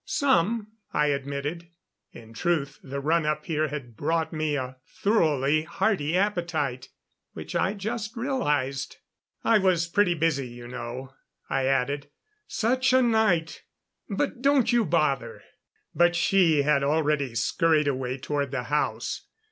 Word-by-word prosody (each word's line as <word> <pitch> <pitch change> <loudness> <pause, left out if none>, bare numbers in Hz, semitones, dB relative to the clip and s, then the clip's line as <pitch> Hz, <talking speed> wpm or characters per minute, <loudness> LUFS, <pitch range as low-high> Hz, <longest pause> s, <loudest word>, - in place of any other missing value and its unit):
"Some," 220 -4 +1 0.2
I 150 - +2
admitted. 140 +4 -3 0.4
In 115 -1 -13
truth 145 +1 -1
the 140 +1 -5
run 160 +4 +2
up 150 0 -1
here 155 -1 0
had 140 -6 -7
brought 160 +5 -1
me 155 -1 -1
a 130 -1 -4
thoroughly 155 - +2
hearty 175 -1 0
appetite, 170 -10 -1 0.4
which - - -8
I 195 +3 +1
just 220 +3 -4
realized. 145 - -1 0.5
"I 225 -2 +4
was 180 -3 +2
pretty 175 0 +2
busy, 155 -5 0
you 120 0 -10
know," 125 +2 -7 0.4
I 135 -1 +1
added. 135 +2 0 0.4
"Such 255 +4 +1
a 260 0 +5
night 215 -9 +2 0.5
but 240 +4 -2
don't 275 -2 +3
you 235 -2 +3
bother." 140 -8 0 0.5
But 175 0 +3
she 170 -5 +3
had 145 -1 +3
already 145 -3 +1
scurried 155 +7 +2
away 130 -2 -1
toward 140 +1 -2
the 130 -2 -3
house. 150 - -1
155 Hz, 135 wpm, -26 LUFS, 140-190 Hz, 0.5 s, a